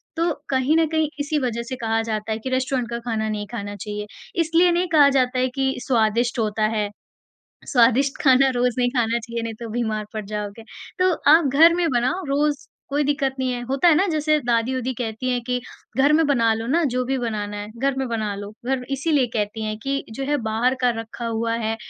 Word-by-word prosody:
तो 335 +1 +1 0.2
कहीं 265 +4 +2
न 325 - +4
कहीं 315 -2 +1
इसी 295 +1 0
वज़ह 240 -3 -2
से 260 - -3
कहा 225 0 +1
जाता 220 -1 -3
है 220 - -1
कि 260 - -5
रेस्टोरेंट 255 -1 -1
का 235 0 -3
खाना 225 -2 -2
नहीं 210 -1 -3
खाना 205 -3 -5
चाहिए, 210 +1 -6 0.3
इसलिए 335 +2 +3
नहीं 350 +1 +1
कहा 295 -3 +6
जाता 255 -2 +1
है 255 - +2
कि 265 -1 +1
स्वादिष्ट 235 0 +1
होता 215 -1 0
है, 210 -1 0 0.8
स्वादिष्ट 260 +2 +3
खाना 270 -1 +5
रोज़ 245 -1 +1
नहीं 245 0 +3
खाना 235 0 +1
चाहिए 235 0 -5
नहीं 230 -1 -4
तो 230 -1 -6
बीमार 220 -2 -2
पड़ 215 -1 -4
जाओगे, 210 +1 -5 0.4
तो 370 0 +4 0.2
आप 320 +1 +6
घर 325 +4 +7
में 345 -1 +1
बनाओ 255 +10 0
रोज़ 290 +1 0 0.2
कोई 290 +1 +1
दिक्कत 275 -2 0
नहीं 260 -1 0
है। 245 - -4
होता 275 +5 +2
है 330 - +6
ना 375 - +3
जैसे 310 -2 +2
दादी-ओदी 245 +2 0
कहती 230 +1 -3
हैं 250 -1 +1
कि 250 0 0 0.4
घर 285 +3 +4
में 320 +1 +4
बना 230 -5 +3
लो 225 +1 -4
ना 330 +7 +2
जो 255 0 +1
भी 265 +1 -1
बनाना 210 -4 -3
है, 205 0 -6
घर 275 +2 0
में 265 -1 -1
बना 220 -3 -2
लो 205 +1 -7
घर 260 0 -1
इसीलिए 275 -1 +1
कहती 215 0 -2
हैं 215 0 -3
कि 275 0 -1
जो 270 +5 -5
है 295 +2 +1
बाहर 225 +4 +1
का 250 - +4
रखा 225 +1 -7
हुआ 230 0 -1
है, 225 -1 -1
250 Hz, 220 wpm, -22 LUFS, 225-275 Hz, 0.8 s, घर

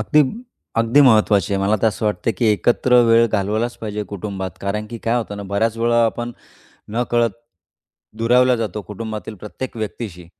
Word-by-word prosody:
अगदी, 150 +7 +4 0.5
अगदी 115 +5 +4
महत्त्वाची 110 -6 +4
आहे 95 - 0
मला 105 +2 +2
तर 115 - +4
असं 110 0 -5
वाटतं 105 +2 0
की 115 - +2
एकत्र 120 +3 +3
वेळ 115 0 +5
घालवलाच 110 +3 -1
पाहिजे 105 -1 -4
कुटुंबात. 95 -1 -4
कारण 105 +2 -3
की 115 - -6
काय 115 +2 0
होतं 110 -4 -3
ना, 100 - -6
बऱ्याच 100 +3 -1
वेळा 120 0 +3
आपण 120 +1 -2 0.6
नकळत 120 -1 +1 0.9
दुरावला 125 +2 +4
जातो 110 -2 -4
कुटुंबातील 110 +1 -6
प्रत्येक 115 +6 -7
व्यक्तीशी 100 -4 -6
110 Hz, 160 wpm, -20 LUFS, 105-120 Hz, 0.9 s, वेळ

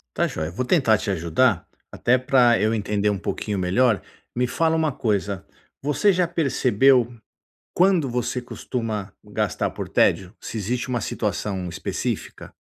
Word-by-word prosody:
Está - - +2
joia, 80 +1 -4
vou 110 +9 -2
tentar 130 -6 +3
te - - -4
ajudar, 90 +3 +1 0.2
até 125 +1 +2
para 125 -4 +4
eu 110 +1 +2
entender 105 -1 0
um 100 - 0
pouquinho 100 +2 -3
melhor, 100 +4 +2 0.4
me 125 +1 +1
fala 160 +6 +1
uma 160 -2 +1
coisa, 100 -5 -1 0.4
você 150 +9 +2
já 180 -1 +2
percebeu, 135 - +3 0.6
quando 180 -5 +3
você 125 +1 -2
costuma 110 -5 -4
gastar - - -1
por - - -6
tédio, 95 -1 +2
se - - -7
existe 120 +5 -2
uma 125 -2 -1
situação 100 -3 -2
específica? 90 +3 -4
120 Hz, 145 wpm, -23 LUFS, 100-130 Hz, 0.6 s, para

